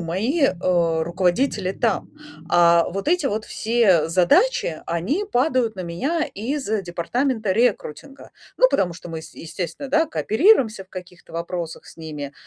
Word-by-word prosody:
мои, 210 - -1
э, 170 -6 +1
руководители 185 +4 0
там. 225 -1 -1 0.4
А 170 -1 +5
вот 195 +8 -4
эти 345 -3 +2
вот 215 -3 -2
все 215 -9 +2
задачи, 175 - +2
они 215 - -1
падают 255 - +1
на 185 - -7
меня 265 - -2
из 265 +6 -4 0.2
департамента 215 +6 -2
рекрутинга. 240 - -1 0.3
Ну, - - +5
потому 180 -3 +1
что 170 - -11
мы, 160 -1 -6
с 160 - -13
естественно, 170 - -6
да, 315 +4 +2
кооперируемся 240 - +2
в - - -36
каких-то 180 -2 -11
вопросах 170 0 -5
с - - -15
ними. 150 -3 -7
190 Hz, 145 wpm, -22 LUFS, 170-260 Hz, 0.4 s, А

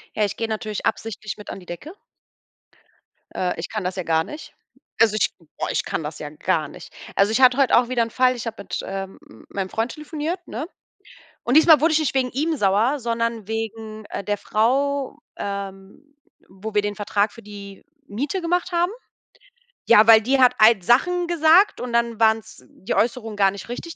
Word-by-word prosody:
Ja, 210 - +2
ich 205 +2 -5
gehe 225 - -2
natürlich 215 -1 -4
absichtlich 215 -1 -3
mit 210 - -11
an - - -7
die 180 - -15
Decke. 265 - -8 1.4
Äh, 180 -1 -2
ich - - -5
kann 215 -3 -4
das 180 +1 -3
ja 185 - -3
gar 160 -1 +1
nicht. 300 - -10 0.5
Also, 220 -2 +5
ich 215 - +2 0.3
boah, - - -2
ich - - -1
kann 160 - -3
das 150 +1 -6
ja 150 - -6
gar 155 0 -1
nicht. - - -13 0.2
Also, 200 +2 +3
ich 260 - +1
hatte 255 0 +6
heute 275 -4 +4
auch 245 0 +2
wieder 240 -2 +2
'n 230 - -5
Fall, 255 +1 +3
ich 240 - -6
habe 225 -2 -6
mit, - - -5
ähm, 195 0 -6
m - - -16
meinem 195 -1 -4
Freund 225 +5 -2
telefoniert, 315 +3 -5
ne? 270 +9 -5 0.8
Und 245 - 0
diesmal 315 -2 +7
wurde 325 0 +3
ich 315 - +4
nicht 285 -4 -1
wegen 255 -2 +1
ihm 310 +5 -1
sauer, 215 +7 +2
sondern 230 -2 -2
wegen, 220 -1 -5
äh, - - -6
der 205 0 -1
Frau, 275 +7 0 0.2
ähm, 200 +8 -7 0.3
wo 195 +3 -8
wir 205 - +3
den 205 0 -3
Vertrag 205 +1 0
für 230 - -13
die 200 -1 -11 0.2
Miete 280 - -3
gemacht 355 +2 -1
haben. 345 +2 +1 1.0
Ja, 220 -1 +7
weil 225 -1 +8
die 265 +5 +1
hat 255 -1 +5
halt 215 -3 +6
Sachen 350 - +3
gesagt 340 +3 +4
und 250 - -4
dann 235 -1 0
waren's 220 -1 +1
die 190 - -5
Äußerungen 225 -1 -1
gar 195 -1 +3
nicht 200 - -9
richtig, 325 +7 -6
225 Hz, 200 wpm, -22 LUFS, 205-275 Hz, 1.4 s, weil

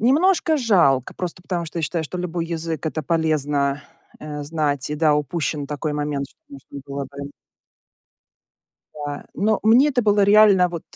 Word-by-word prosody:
немножко 315 - +3
жалко, 170 - +2
просто 175 -1 -5
потому 175 -2 -3
что 165 +1 -6
я - - -2
считаю, 160 +1 -2
что 180 +4 -6
любой 170 -1 -3
язык- 165 -1 -4
это 155 0 -3
полезно, 145 -3 0 0.4
э, 150 -1 -6
знать. 145 -2 -2
И - - -1
да, 150 -1 +3
упущен 150 -1 -2
такой 150 +1 -3
момент, 145 -1 -2
что - - -30
нужно 275 - -11
было 140 0 -4
бы 140 +1 -8 1.6
Да. 145 -1 -6
Но 215 +2 +1
мне 240 +7 +5
это 250 -4 0
было 205 -1 +3
реально 200 -3 +6
вот 170 -2 -6
160 Hz, 165 wpm, -22 LUFS, 145-195 Hz, 1.6 s, реально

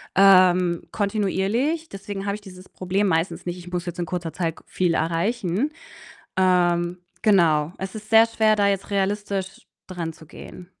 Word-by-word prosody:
ähm, 185 -3 +5
kontinuierlich. 215 - -1
Deswegen 195 0 -6
habe 200 - -1
ich 210 - -10
dieses 185 -2 -13
Problem 190 +2 -1
meistens 165 +1 -1
nicht: 175 0 -4
Ich 180 0 -11
muss 180 0 -3
jetzt 175 0 -6
in 170 - -2
kurzer 170 -3 -4
Zeit 165 -2 -2
k - - -16
viel 175 -3 0
erreichen. 185 - -1 0.7
Ähm, 175 -1 +2 0.2
genau. 170 -7 +3
Es 190 +2 -6
ist 215 0 -9
sehr 225 0 +7
schwer, 220 -1 +2
da 200 -1 +3
jetzt 195 0 -2
realistisch 200 -1 -2 0.2
dranzugehen. 170 0 -8
190 Hz, 155 wpm, -23 LUFS, 175-205 Hz, 0.7 s, sehr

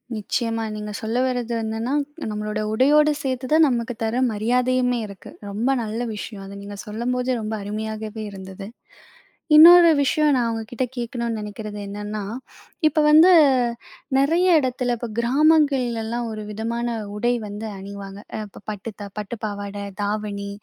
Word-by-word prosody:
நிச்சயமா. 225 +1 -2
நீங்க 210 0 -5
சொல்ல 225 +2 -2
வர்றது 245 -2 -2
என்னன்னா, 225 +4 -2 0.4
நம்பளோட 210 0 -3
உடையோட 295 +5 +5
சேர்த்து 260 -1 -2
தான் 320 0 +6
நமக்கு 240 -1 -1
தர 225 +2 -1
மரியாதையுமே 250 +3 +1
இருக்கு. 200 -2 -12 0.2
ரொம்ப 220 +6 -1
நல்ல 220 +2 -4 0.2
விஷயம். 205 -1 -7
அத 200 +1 -9
நீங்க 205 0 -8
சொல்லும்போதே 250 +4 -1
ரொம்ப 215 +1 -4
அருமையாகவே 215 +1 -5
இருந்தது. 190 0 -9 0.9
இன்னொரு 340 +2 +10
விஷயம் 300 +2 +2
நான் 245 -2 +1
அவங்க 225 -1 -2
கிட்ட 250 +1 -1
கேட்கணும்னு 235 -1 -3
நினைக்குறது 210 0 -7
என்னன்னா, 205 +1 -5 0.7
இப்ப 310 +1 +2
வந்து 320 +5 +8 0.9
நெறைய 335 +5 +4
இடத்துல, 250 -2 -1
இப்ப 240 - -5
கிராமங்கள்லலாம் 245 -4 +2
ஒரு 215 -1 -6
விதமான 230 +3 -3 0.3
உடை 240 +3 +1
வந்து 210 +2 -6
அணிவாங்க. 200 0 -8 0.3
இப்ப 200 - -14
பட்டு 210 +2 -5 0.3
பட்டு 210 +3 -5
த - - -16
பாவாடை, 205 -1 -5 0.2
தாவணி. 205 -1 -3
225 Hz, 135 wpm, -23 LUFS, 210-250 Hz, 0.9 s, இன்னொரு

